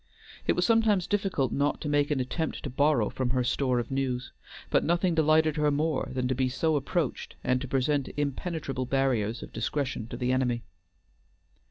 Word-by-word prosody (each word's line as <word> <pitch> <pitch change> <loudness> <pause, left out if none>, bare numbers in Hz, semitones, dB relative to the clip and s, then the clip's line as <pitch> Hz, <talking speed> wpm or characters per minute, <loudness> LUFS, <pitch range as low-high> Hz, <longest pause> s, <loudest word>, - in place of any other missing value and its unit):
It - - +4
was - - +1
sometimes 220 -5 +3
difficult 195 - 0
not 145 +1 0
to - - -3
make 145 0 +2
an 145 -3 +1
attempt 150 +6 -3
to 140 - -4
borrow 140 -4 +2
from 130 -2 -2
her 125 0 +1
store 125 0 +1
of 120 +1 -2
news, 130 -2 -2 0.4
but - - +3
nothing 175 +2 +2
delighted 155 -1 +3
her 150 0 +3
more 150 0 0
than 130 -1 -1
to 130 - +1
be 130 0 0
so 155 +5 +1
approached, 145 +1 -2
and 125 0 +1
to 135 - -4
present 135 +1 0
impenetrable 145 -2 -2
barriers 125 -4 0
of - - -11
discretion 120 0 -2
to 120 - -6
the 125 0 0
enemy. 125 -3 0
135 Hz, 185 wpm, -28 LUFS, 125-155 Hz, 0.4 s, It